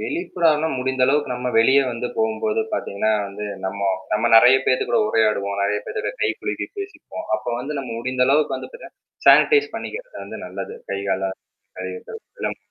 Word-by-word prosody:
வெளிப்புறம்னா 165 - +1
முடிந்தளவுக்கு 130 +2 +1
நம்ம 125 +1 -3
வெளிய 130 +5 +6
வந்து 120 +1 -3
போம்போது 110 - 0
பார்த்தீங்கன்னா 100 +2 -1 0.2
வந்து 100 +1 -7 0.2
நம்ம, 100 +1 -3 0.3
நம்ம 105 - +1
நிறைய 125 +3 +8
பேத்துக்கூட 130 - +2
உரையாடுவோம். 100 - +1
நிறைய 105 +1 +1
பேர் - - -4
கூட 415 - -3
கைக்குலுக்கிப் - - -3
பேசிப்போம். 395 - -7
அப்ப 110 - -11
வந்து 145 +4 -5
நம்ம 130 -3 -5
முடிந்த 125 +2 0
அளவுக்கு 145 +3 +2
வந்து - - -8
பாத்தேன்னா, 480 - -11 0.3
சானிடைஸ் 435 -1 +6
பண்ணிக்கிறது - - -7
வந்து - - -8
நல்லது. 455 - -6
கை, 100 - -2
கால 95 0 0 0.5
கழுவிக்கிறது 95 0 -7 0.2
எல்லாம். - - -2
125 Hz, 155 wpm, -22 LUFS, 105-165 Hz, 0.5 s, நிறைய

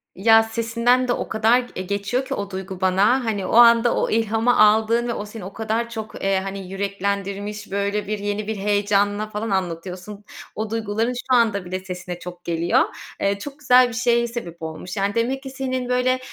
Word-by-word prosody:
Ya, 225 +3 +5
sesinden 230 +3 +1
de 245 - +2
o - - -4
kadar 225 +3 +3
g 245 -1 -7
eee, 185 - -3
geçiyor 200 +7 -2
ki 270 - -4
o 200 -5 -4
duygu 190 -1 -7
bana, 200 +7 +3
hani, 205 -4 -1
o - - -4
anda 235 0 +6
o - - 0
ilhamı 225 +2 +1
aldığın 220 +3 +4
ve 235 - -1
o 205 - -5
seni 210 -2 -9
o 195 - -8
kadar 225 +1 -2
çok, 220 -2 -7
eee, 195 0 +2
hani, 195 -1 -6
yüreklendirmiş, 200 +1 -3
böyle, 200 +1 -1
bir 210 0 -2
yeni 205 +1 -3
bir 220 - -2
heyecanla 205 +1 +1
falan 215 +1 -4
anlatıyorsun. 185 +2 -4 0.3
O 215 0 -3
duyguların 225 +2 -1
şu 250 +1 0
anda 220 -5 +2
bile 185 +1 -4
sesine 180 -1 -7
çok 175 0 -9
geliyor. 170 0 +1 0.4
Eee, 200 0 +1
çok 285 +6 -8
güzel 250 -3 +5
bir - - -8
şeye 235 0 +2
sebep 180 -9 -7
olmuş. 160 +5 -6
Yani, 200 +1 0
demek 255 +4 0
ki 270 - -6
senin, 260 -1 -3
böyle, 250 +1 +2
210 Hz, 200 wpm, -22 LUFS, 195-235 Hz, 0.4 s, anda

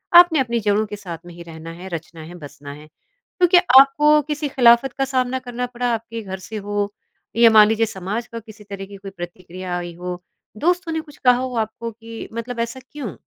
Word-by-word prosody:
आपने 350 -3 +8
अपनी 235 -3 0
जड़ों 210 0 +1
के 210 - -7
साथ 175 -5 -7
में 175 - -11
ही 170 - -11
रहना 165 0 -9
है, 180 +3 -9
रचना 165 0 -7
है, 175 +3 -10
बसना 145 -3 -10
है। 150 +1 -13 0.5
तो 355 - +6
क्या 355 0 +6 0.2
आपको 295 +2 +5
किसी 300 -1 -2
खिलाफ़त 245 0 +5
का 270 - +1
सामना 260 -1 0
करना 250 -1 -4
पड़ा, 245 0 -3
आपके 230 0 -4
घर 190 -2 -6
से 215 +3 -7
हो 205 0 -2 0.4
या 230 0 +7
मान 215 -1 +8
लीजिए 225 +1 +2
समाज 205 +3 -4
का 230 - -7
किसी 220 -1 -14
तरह 200 -1 -7
की 200 - -12
कोई 195 0 -9
प्रतिक्रिया 175 +1 -6
आई 175 -1 -5
हो, 180 0 -6 0.4
दोस्तों 350 - +1
ने 320 - -1
कुछ 300 -2 -16
कहा 250 -1 +6
हो 255 -1 -3
आपको 225 +1 -3
कि 225 +1 -9
मतलब 230 +1 -5
ऐसा 235 +2 -3
क्यों? 240 - -6
225 Hz, 215 wpm, -21 LUFS, 185-250 Hz, 0.5 s, आपने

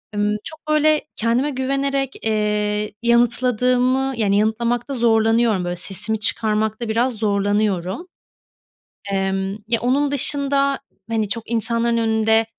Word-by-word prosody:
ımm, 210 +1 +1
çok, 315 0 -9
böyle, 305 0 +3
kendime 235 +5 +1
güvenerek, 275 0 -1
ııı, 210 -1 0
yanıtladığımı 250 +2 +2
Yani 200 -2 +2
yanıtlamakta 235 +4 0
zorlanıyorum, 225 -4 +2
böyle, 175 - -2
sesimi 205 +4 -3
çıkarmakta 220 +1 0
biraz 240 +3 +1
zorlanıyorum. 205 - 0 1.0
Emm, 195 0 -1
ya, 230 -1 0
onun 275 +4 +1
dışında 280 0 +1 0.3
hani 220 -3 -1
çok 230 +1 -5
insanların 230 +1 0
önünde, 220 0 +2
230 Hz, 110 wpm, -20 LUFS, 210-255 Hz, 1.0 s, böyle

